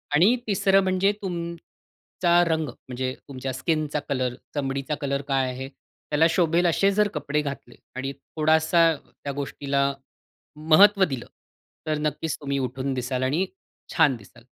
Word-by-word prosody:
आणि 195 +11 +5
तिसरं 195 -1 +3
म्हणजे 190 +2 +2
तुमचा 170 0 -2
रंग, 160 -2 0
म्हणजे 130 +1 -5
तुमच्या 130 -1 -5
स्किनचा 150 +2 -1
कलर 130 -3 0 0.2
चमडीचा 135 +1 -2
कलर 140 -1 -1
काय 135 -2 +1
आहे? 130 +2 -6
त्याला 150 +2 -2
शोभेल 170 +1 +2
असे 195 +4 +3
जर 210 +1 +3
कपडे 150 +1 -1
घातले 140 -4 -6 0.2
आणि 135 +1 -3
थोडासा 160 +2 +2
त्या 140 0 -9
गोष्टीला 140 0 -1 0.6
महत्व 190 +6 +6
दिलं, 135 -7 -4 0.6
तर 155 -1 0
नक्कीच 150 +1 -2
तुम्ही 140 -1 -2
उठून 130 +1 -2
दिसाल 125 0 -2
आणि 150 +9 +1 0.5
छान 150 -6 +4
दिसाल. 115 +2 -17
150 Hz, 135 wpm, -25 LUFS, 135-170 Hz, 0.6 s, महत्व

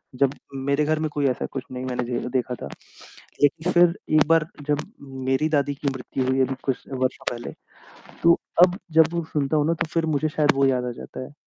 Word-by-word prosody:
जब 135 +1 +2 0.2
मेरे 140 +2 0
घर 155 +1 +1
में 155 0 -1
कोई 145 -1 0
ऐसा 125 - -1
कुछ 135 - -4
नहीं 130 0 -5
मैंने 125 -1 -2
जे 120 0 -2
देखा 125 -1 0
था - - -4 0.8
लेकिन 155 +5 +2
फ़िर 175 -1 +5 0.2
एक 155 -1 +5
बार 165 -1 +4 0.2
जब 145 -1 +2 0.5
मेरी 135 +4 +2
दादी 145 -2 +1
की 140 +1 -3
मृत्यु 130 0 -3
हुई, 130 +1 +1
अभी 130 0 +2
कुछ 135 -2 -2
वर्ष 130 -1 -1
पहले 120 0 -6 0.7
तो 170 0 +7 0.3
अब 180 +1 -5
जब 160 +1 +5
वो 170 -1 -1
सुनता 145 0 +1
हूँ 150 -1 +2
ना 165 - +2
तो - - -2
फिर 165 -1 +1
मुझे 155 +2 0
शायद 150 -1 +2
वो 135 0 +3
याद 130 -2 +1
आ 125 - -2
जाता - - -8
है। 130 - -12
140 Hz, 220 wpm, -24 LUFS, 130-155 Hz, 0.8 s, तो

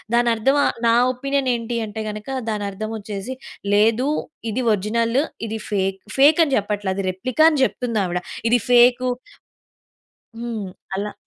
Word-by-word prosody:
దాని 240 0 +3
అర్థం 270 +6 +2
ఆహ్, - - +1
నా 230 - +5 0.2
ఒపీనియన్ 275 +1 -1
ఏంటి 235 0 -3
అంటే 215 +1 -5
గనుక 210 +3 -7 0.2
దాని 210 -2 -2
అర్థం 215 +3 -5
వచ్చేసి 210 +4 -6 0.4
లేదు. 225 +5 +3 0.4
ఇది 255 +4 -1
ఒరిజినల్. 230 +5 +1 0.3
ఇది 220 0 -4
ఫేక్. 195 -2 -1 0.2
ఫేక్ 290 +4 +6
అని 275 -3 0
చెప్పట్లే. 205 -1 -1
అది 195 0 -2
రెప్లికా 255 +11 +1
అని 295 -3 0
చెప్తుంది 235 -4 -2
ఆవిడ. 180 0 -2 0.3
ఇది 245 +1 +4
ఫేకు 245 +1 +5 1.3
హ్మ్. 230 -4 -4 0.3
అలా. 205 +2 -3
225 Hz, 150 wpm, -21 LUFS, 205-250 Hz, 1.3 s, ఫేక్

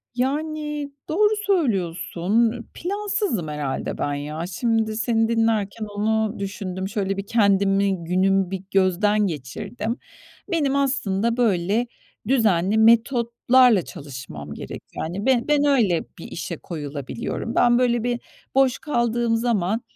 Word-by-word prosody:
Yani, 295 +2 -2 0.2
doğru 420 +6 +3
söylüyorsun. 210 - +1 0.2
Plansızım 395 - -2
herhâlde 150 -3 -3
ben 145 - -1
ya. 150 +3 -4
Şimdi, 220 +3 0
seni 225 0 +2
dinlerken 225 -2 0
onu 215 +1 -1
düşündüm. 190 -1 -4
Şöyle 195 -1 -2
bir 195 - -4
kendimi, 195 -4 +2
günümü 190 +2 +2
bir 190 -1 -4
gözden 200 +2 +3
geçirdim. 205 - -4 0.5
Benim, 290 -5 +1
aslında, 235 -5 0
böyle, 215 +1 +1 0.4
düzenli 215 -6 +3
metotlarla 235 0 +4
çalışmam 130 - -8
gerek, - - -8
yani. 180 +6 -4
Be 260 -2 +4
ben 295 -1 +3
öyle 225 - +3
bir - - -9
işe 170 -1 -5
koyulabiliyorum. 150 - -5
Ben, 240 0 +4
böyle 240 -2 +2
bir 240 0 -1 0.4
boş 265 -2 +3
kaldığım 235 -4 0
zaman 225 -2 0
215 Hz, 115 wpm, -23 LUFS, 185-245 Hz, 0.5 s, metotlarla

